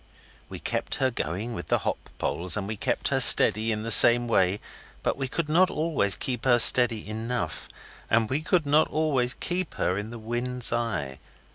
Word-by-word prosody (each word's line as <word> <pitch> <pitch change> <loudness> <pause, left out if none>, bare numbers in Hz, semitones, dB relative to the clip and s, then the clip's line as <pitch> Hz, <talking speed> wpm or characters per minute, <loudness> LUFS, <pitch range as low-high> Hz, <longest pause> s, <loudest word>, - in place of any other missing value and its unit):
We - - -9
kept - - -5
her 130 -1 -1
going 105 +3 -5
with 90 - -8
the - - 0
hop - - -5
poles, 90 +4 -1
and 100 -2 -5
we 110 - -5
kept - - -3
her 135 - -1
steady 115 -2 +6
in 105 0 -4
the 115 - -3
same 120 +2 +7
way, 95 -3 0 0.4
but - - -2
we 135 -1 -5
could 155 +4 -5
not 175 +5 +2
always 150 -11 0
keep 125 -3 -5
her 120 -2 +3
steady 120 -2 +5
enough, 110 -5 -6 0.4
and 115 0 +1
we 135 +6 -3
could 165 0 -1
not 150 +2 +1
always 140 -5 -1
keep 180 -1 -5
her 90 +2 -2
in 105 +1 -8
the 120 - -10
wind's 120 +2 -1
eye. 105 - -4
120 Hz, 190 wpm, -24 LUFS, 110-135 Hz, 0.4 s, same